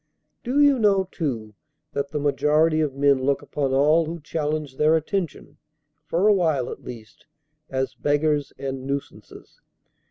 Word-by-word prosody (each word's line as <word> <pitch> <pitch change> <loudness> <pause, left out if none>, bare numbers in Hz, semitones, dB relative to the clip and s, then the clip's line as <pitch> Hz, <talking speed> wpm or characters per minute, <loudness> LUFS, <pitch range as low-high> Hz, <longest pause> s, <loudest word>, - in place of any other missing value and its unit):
Do 260 +4 0
you 285 -3 +5
know, 195 -3 +3
too, 115 - -3 0.4
that 140 0 -2
the 150 - -4
majority 150 +2 +2
of 145 -4 -1
men 140 -1 +3
look 140 +1 0
upon 140 -2 -2
all 150 +5 +4
who 170 +1 -5
challenge 150 -2 -3
their 155 +1 +4
attention, 170 +2 -3 0.5
for 180 +5 +2
a 210 - +6
while, 160 -9 +1
at - - -9
least, 110 -3 -11 0.4
as 130 0 -2
beggars, 145 0 0
and 135 -1 -5
nuisances? 140 0 -7
150 Hz, 150 wpm, -24 LUFS, 140-165 Hz, 0.5 s, a